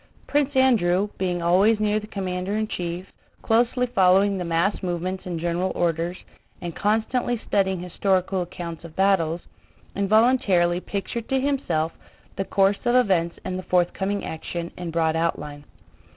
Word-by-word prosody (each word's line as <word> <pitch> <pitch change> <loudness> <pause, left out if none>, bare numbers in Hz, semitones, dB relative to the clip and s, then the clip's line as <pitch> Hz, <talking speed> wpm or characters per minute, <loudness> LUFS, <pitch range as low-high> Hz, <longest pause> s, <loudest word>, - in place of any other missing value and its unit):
Prince 290 -1 0
Andrew, 210 -7 +3
being 180 -2 -1
always 195 +6 +4
near 210 0 +1
the 215 - -10
commander 190 -1 -3
in 215 0 -1
chief, 175 -1 -4 0.4
closely 240 +2 +2
following 195 -3 +4
the 185 - -3
mass 170 +4 0
movements 185 +1 -3
and 175 -2 -3
general 175 +2 -1
orders, 170 +1 0 0.4
and 170 -2 -6
constantly 225 +3 0
studying 190 -2 +1
historical 185 +1 0
accounts 170 -1 -6
of 170 -2 -11
battles, 175 -4 +2 0.5
involuntarily 200 -4 +3
pictured 210 +5 -5
to 265 - +2
himself 220 - 0 0.4
the 195 - -2
course 195 +1 +2
of 240 0 +2
events 185 -9 +2
in 185 -1 -3
the - - -4
forthcoming 190 +3 +1
action 170 +1 -5
in 175 -1 -5
broad 160 -1 +1
outline. 150 -3 -2
185 Hz, 145 wpm, -24 LUFS, 175-210 Hz, 0.5 s, always